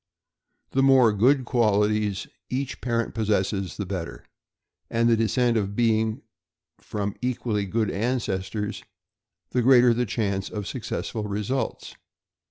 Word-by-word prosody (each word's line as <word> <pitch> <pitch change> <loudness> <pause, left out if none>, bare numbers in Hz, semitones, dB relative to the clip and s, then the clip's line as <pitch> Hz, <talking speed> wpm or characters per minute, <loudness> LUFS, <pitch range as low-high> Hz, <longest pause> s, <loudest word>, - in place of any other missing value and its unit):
The 135 - +2
more 130 -5 +5
good 130 +6 +3
qualities 105 -4 +1 0.2
each 130 +1 -3
parent 115 -2 -1
possesses 100 -3 -1
the 100 - -3
better, 90 -3 -5 0.6
and 115 +1 +2
the 115 - +5
descent 115 -2 +1
being 110 -1 +1 0.6
from 100 -1 -4
equally 115 -5 -1
good 110 +1 0
ancestors, 105 -3 -2 0.7
the 125 - +1
greater 125 -1 +6
the 120 +1 -1
chance 100 -2 -1
of 105 -2 -5
successful 110 -1 -4
results. 105 +6 -3
110 Hz, 115 wpm, -25 LUFS, 100-120 Hz, 0.7 s, greater